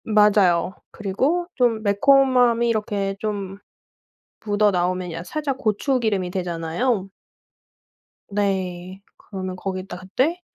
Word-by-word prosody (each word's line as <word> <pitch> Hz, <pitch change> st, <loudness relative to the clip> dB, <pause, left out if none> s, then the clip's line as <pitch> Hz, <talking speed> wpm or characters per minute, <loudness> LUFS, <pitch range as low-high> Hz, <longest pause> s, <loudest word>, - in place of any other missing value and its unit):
맞아요. 205 Hz, -5 st, +3 dB, 0.2 s
그리고 265 Hz, -, 0 dB
쫌 235 Hz, -4 st, +2 dB
매콤함이 245 Hz, +2 st, +4 dB
이렇게 205 Hz, -3 st, -1 dB
좀 200 Hz, -2 st, -4 dB, 0.9 s
묻어나오면 185 Hz, -4 st, +1 dB
약 165 Hz, +2 st, -6 dB
살짝 290 Hz, -4 st, -3 dB
고추기름이 215 Hz, -5 st, 0 dB
되잖아요. 185 Hz, +5 st, -1 dB, 1.2 s
네. 190 Hz, -2 st, -2 dB, 0.2 s
그러면 185 Hz, -2 st, -6 dB
거기다 185 Hz, -1 st, -5 dB
그때 260 Hz, -, -1 dB
200 Hz, 235 characters per minute, -22 LUFS, 185-235 Hz, 1.2 s, 매콤함이